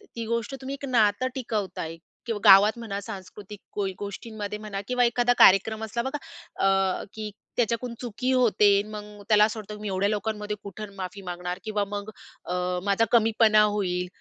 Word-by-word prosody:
ती 230 -1 -4
गोष्ट 235 +3 -2
तुम्ही 265 +1 -5
एक - - -4
नातं 225 0 +3
टिकवताय 195 -9 -3 0.3
किंवा 225 -3 -2
गावात 205 +3 +8
म्हणा 200 -4 -4
सांस्कृतिक 200 0 -9
कोई 195 -2 -2
गोष्टींमध्ये 205 +1 -6
म्हणा 205 -2 -5
किंवा 250 0 +2
एखादा 240 +1 +2
कार्यक्रम 215 +3 +5
असला 220 +2 -2
बघा 265 +3 -3 0.5
अ, 195 -1 +2
की 215 -1 -6 0.3
त्याच्याकडून 235 +1 0
चुकी 250 +2 -2
होते. 220 -5 +4
मग 210 -1 -9
त्याला 210 -1 +6
असं 220 +1 -4
वाटतं, 210 0 -8
की 210 - -11
मी 210 - -4
एवढ्या 195 +1 0
लोकांमध्ये 210 0 -2
कुठं 200 +1 -8
माफी 185 +1 -6
मागणार. 180 0 -5
किंवा 215 -2 -1
मग 205 +1 -4 0.4
अ, 180 - -3 0.3
माझा 200 +3 +3
कमीपणा 220 -2 +5
होईल. 185 -4 0
210 Hz, 170 wpm, -26 LUFS, 200-225 Hz, 0.5 s, गावात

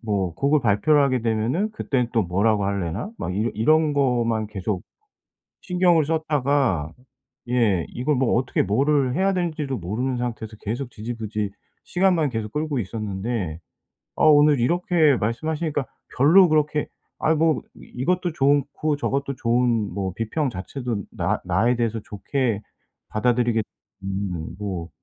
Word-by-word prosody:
뭐 100 -6 -1
곡을 140 - +2
발표를 120 +7 +3
하게 130 -3 +1
되면은 120 - 0
그때는 125 - -1
또 115 -3 +3
뭐라고 100 +4 +1
하려나?' 100 - -2
막 90 - -3
이런 110 +4 -1
이런 155 +7 +3
거만 120 -6 +1
계속 100 -2 -3 0.8
신경을 180 -4 +3
썼다가 140 - 0 0.6
예 110 -9 +2
이걸 135 +4 -1
뭐 125 -2 +1
어떻게 130 +1 +1
뭐를 135 +5 +2
해야 195 +1 +2
될지도 155 -7 -2
모르는 120 +8 -2
상태에서 115 -3 -4
계속 120 +4 -4
지지부진 110 -2 -4 0.3
시간만 175 -5 +2
계속 110 -3 -4
끌고 150 -3 -1
있었는데 100 -4 -3 0.6
아 - - +2
오늘 145 -3 +6
이렇게 165 0 +3
말씀하시니까 145 +6 -2 0.3
별로 165 +7 +6
그렇게 150 -1 +1 0.3
'아이 160 +1 +2
뭐 155 -3 +2
이것도 175 +6 -2
좋은 140 -1 +3
고 150 -1 -1
저것도 140 -1 -2
좋은 120 -3 +1
뭐 95 -2 -3
비평 130 +6 -1
자체도 115 +2 -4
나 - - -1
나에 120 +2 +2
대해서 115 -1 -1
좋게 110 +1 -2 0.5
받아들이겠 120 0 +1 0.4
음 95 -4 -4
뭐 95 -5 -4
125 Hz, 300 characters per minute, -23 LUFS, 105-150 Hz, 0.8 s, 오늘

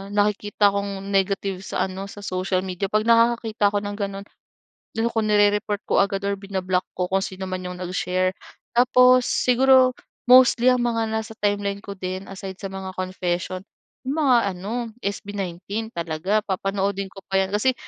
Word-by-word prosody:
nakikita 205 0 +2
kong 200 -1 -3
negative 195 -1 0
sa - - -1
ano, 190 +1 -6
sa 205 +1 -10
social 185 0 -1
media. 190 +1 -3
'Pag 215 +2 +1
nakakakita 230 -2 +3
ako 205 - +1
ng 205 0 -4
ganun, 200 -1 -4 0.7
ano 230 +1 +1
ko, 225 - 0
nirereport 205 0 +2
ko - - +2
agad 195 0 -2
or 200 - 0
bina-block 190 -2 -2
ko 180 -1 0
kung 195 0 +2
sinoman 185 -1 -5
yung 180 - -6
nag-share. 185 +1 0 0.5
Tapos 250 0 +6
siguro 255 +1 +4 0.4
mostly 255 -1 +7
ang 250 -1 +1
mga 230 -2 0
nasa 220 0 -3
timeline 205 -1 -1
ko 200 0 -7
din 185 +1 -5
aside 190 -1 -7
sa 195 - -4
mga 190 -1 -6
confession, 185 0 -3 0.5
yung 295 +4 -1
mga 255 -4 +5 0.2
ano, 225 +4 -4
SB19 200 +2 -4
talaga. 170 +6 0
Papanoodin 195 0 -2
ko 195 - -12
pa 195 0 +3
yan. 190 - -1
Kasi 255 +5 +2
200 Hz, 160 wpm, -23 LUFS, 190-220 Hz, 0.7 s, mostly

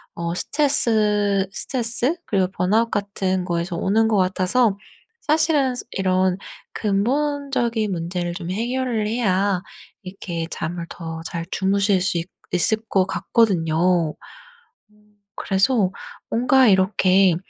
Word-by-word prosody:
어 170 0 -3
스트레스 210 - +1
스트레스 240 - -1
그리고 190 -3 +1
번아웃 210 +6 +1
같은 190 -2 -1
거에서 170 0 -2
오는 215 +6 +2
것 215 -2 +2
같아서 190 +4 +2 0.4
사실은 305 -4 +2
스 - - -6
이런 185 -1 +1 0.4
근본적인 240 0 0
문제를 175 0 -3
좀 175 -1 -6
해결을 235 +1 -1
해야 200 -4 +1 0.4
이렇게 175 -3 -5
잠을 170 0 -4
더 165 -1 -7
잘 170 0 -4
주무실 200 0 +1
수 180 -1 0
있 165 - -2 0.3
있을 180 +5 +2
것 190 -2 +3
같거든요. 175 -6 +1 0.8
음 210 0 -28 0.2
그래서 195 0 +1 0.4
뭔가 250 +2 +4
이렇게 190 -2 +4
195 Hz, 250 characters per minute, -22 LUFS, 180-230 Hz, 0.8 s, 뭔가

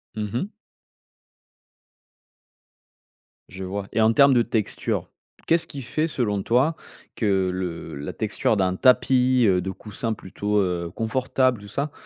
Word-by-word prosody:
Mmh 105 -1 -3
mh. 160 - -3 3.0
Je 95 +1 -8
vois 100 +1 -4
et 115 - +1
en 110 +1 +4
termes 140 +2 +6
de 120 - +4
texture. 115 -3 -2 0.4
Qu'est-ce 165 0 +2
qui 140 - -6
fait 155 +6 -1
selon 105 -10 -1
toi 130 +10 +2 0.4
que 95 -4 +1
le 90 -2 -5
la 70 +1 -6
texture 110 0 0
d'un 95 -2 +1
tapis, 130 0 +4
heu, 95 -2 +3
de 95 +1 -3
coussins 110 +3 -4
plutôt, 105 +1 -2
heu, 90 -2 -2
confortable 130 +1 +1
tout 100 - -11
ça, 140 +8 -3
110 Hz, 140 wpm, -24 LUFS, 95-130 Hz, 3.0 s, termes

